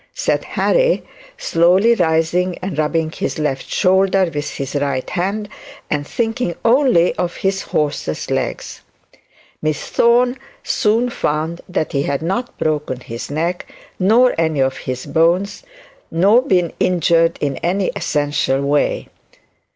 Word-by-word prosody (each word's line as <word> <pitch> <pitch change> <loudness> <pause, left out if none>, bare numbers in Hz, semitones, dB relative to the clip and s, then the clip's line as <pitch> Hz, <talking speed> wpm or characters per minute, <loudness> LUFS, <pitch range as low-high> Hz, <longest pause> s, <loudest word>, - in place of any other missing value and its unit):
said - - 0
Harry, - - +1 0.3
slowly 180 +7 +3
rising 175 -1 +1
and 180 -5 -5
rubbing 155 +1 0
his - - -3
left 145 -4 -2
shoulder 190 -1 +2
with 145 0 -3
his 135 -1 -5
right 140 -3 -1
hand, 200 +4 -2 0.4
and 145 -1 -1
thinking 225 -6 -2
only 235 -8 +4
of 175 -1 -2
his 195 0 -1
horse's 145 - -2
legs. - - -3 0.8
Miss 155 -1 -1
Thorne 245 +2 +3 0.2
soon 230 +3 +1
found 160 -1 -2
that 165 -3 -2
he 140 - 0
had 140 +1 -2
not 195 +9 -3
broken 150 -5 -1
his 115 -1 -7
neck, 165 +5 -2 0.3
nor 230 +7 +4
any 160 -3 +1
of 130 0 +1
his 130 0 -5
bones, 170 +7 +1 0.5
nor 200 +9 +4
been 180 - +1
injured 170 -2 +2
in 140 -2 -2
any 185 +2 0
essential 145 -6 0
way. 145 +1 0
170 Hz, 130 wpm, -18 LUFS, 150-195 Hz, 0.8 s, only